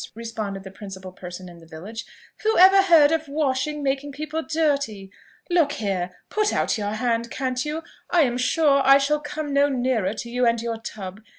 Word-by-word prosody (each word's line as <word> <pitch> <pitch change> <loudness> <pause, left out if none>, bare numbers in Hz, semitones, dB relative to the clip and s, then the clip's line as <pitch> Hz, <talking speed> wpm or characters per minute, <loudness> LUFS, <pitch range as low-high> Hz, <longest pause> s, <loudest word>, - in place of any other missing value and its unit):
responded 220 -4 -5
the 190 - -9
principal 190 -2 -9
person 180 0 -9
in 175 -1 -13
the 165 - -16
village, 200 +9 -8 0.4
"whoever 390 -3 +6
heard 330 -6 +6
of 320 -1 0
washing 290 0 -1
making 275 +1 -1
people 305 +3 -4
dirty? 280 -12 -1 0.4
Look 335 -5 +2
here, 195 -8 -2 0.2
put 425 -1 0
out - - 0
your 205 -1 -3
hand, 235 +1 -1
can't 255 0 -2
you? 305 +2 -4 0.3
I 345 - +4
am 245 -2 -1
sure 280 +1 +3
I 275 +1 +7
shall 290 +2 +1
come 295 0 -5
no 280 +1 +4
nearer 245 -6 0
to 235 - -6
you 245 +1 -2
and 235 0 +2
your 230 0 -3
tub. 205 -3 -8
255 Hz, 185 wpm, -23 LUFS, 210-300 Hz, 0.4 s, I